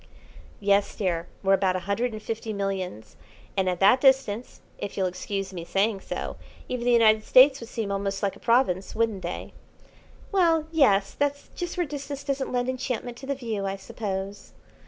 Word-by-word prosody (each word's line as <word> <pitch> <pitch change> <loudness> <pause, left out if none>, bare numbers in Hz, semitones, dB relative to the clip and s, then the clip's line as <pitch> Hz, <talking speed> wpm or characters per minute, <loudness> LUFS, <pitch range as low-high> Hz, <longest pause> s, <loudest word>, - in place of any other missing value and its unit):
"Yes, 200 0 +2
dear; 175 -4 -1 0.2
we're 195 0 +4
about 190 -1 +2
a 185 - -2
hundred 230 +6 -1
and 215 -1 -7
fifty 225 -1 -4
millions, 190 - -4 0.4
and 190 -2 +2
at 180 -1 -2
that 210 +7 +6
distance, 260 -4 +2 0.2
if 200 - -5
you'll 190 - +2
excuse 190 +2 -3
me 175 -2 -5
saying 195 +4 +1
so, - - -5 0.3
even 245 -1 -3
the 245 - +4
United 220 -2 +5
States 265 +3 +6
would 230 - -9
seem 215 -3 -3
almost 195 0 -2
like 200 - 0
a - - -15
province, 230 -6 +2
wouldn't 220 -4 0
they?" - - -5 0.8
"Well, 335 -5 +3
yes; 205 -11 +3
that's 285 0 -1
just 350 +1 -4
where 350 - +1
distance 280 -1 -6
doesn't 275 -1 -2
lend 245 0 0
enchantment 250 -2 -3
to 265 - -10
the 280 - 0
view, 220 -6 -3
I 195 - -2
suppose." 195 -1 -5
215 Hz, 180 wpm, -26 LUFS, 195-255 Hz, 0.8 s, that